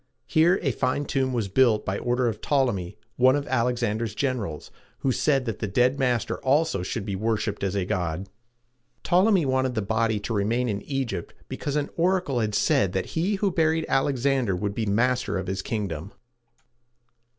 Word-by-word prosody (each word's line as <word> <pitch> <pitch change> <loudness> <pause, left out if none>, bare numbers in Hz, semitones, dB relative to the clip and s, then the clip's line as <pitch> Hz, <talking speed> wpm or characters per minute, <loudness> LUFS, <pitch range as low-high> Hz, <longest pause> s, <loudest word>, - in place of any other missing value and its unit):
Here 170 +5 +4
a 135 - +2
fine 130 +5 -1
tomb 135 -2 0
was 115 -5 -1
built 110 +1 +3
by 95 +1 -2
order 125 0 0
of 115 - -3
Ptol´e 135 -4 +2
my, 90 -2 -6 0.2
one 130 +2 +5
of 145 -1 -2
Alexander's 115 -3 0
generals, 115 - -3 0.3
who 135 - +1
said 135 0 +1
that 115 -5 -4
his 110 - -2
dead 125 +4 +3
master 125 -4 0
also 145 - +1
should 100 +3 -4
be 100 -2 -3
worshiped 105 0 -1
as 100 0 -1
a 95 -2 0
god. 90 -2 -2 0.8
Ptolemy 185 -1 +3
wanted 130 -1 0
the 110 - 0
body 110 +1 0
to 115 - -3
remain 115 +4 0
in 100 -3 -2
Egypt 135 - -4
because 145 - -4
an 145 -1 -1
oracle 175 -6 +1
had 105 -2 -1
said 95 -3 +2
that 95 - -2
he 180 +6 +1
who 195 0 0
buried 160 -1 +1
Alexander 135 -5 +1
would 100 +2 -2
be 110 0 -2
master 125 +4 +1
of 95 - -3
his 95 0 -3
kingdom. 100 -4 -4
120 Hz, 180 wpm, -25 LUFS, 100-135 Hz, 0.8 s, one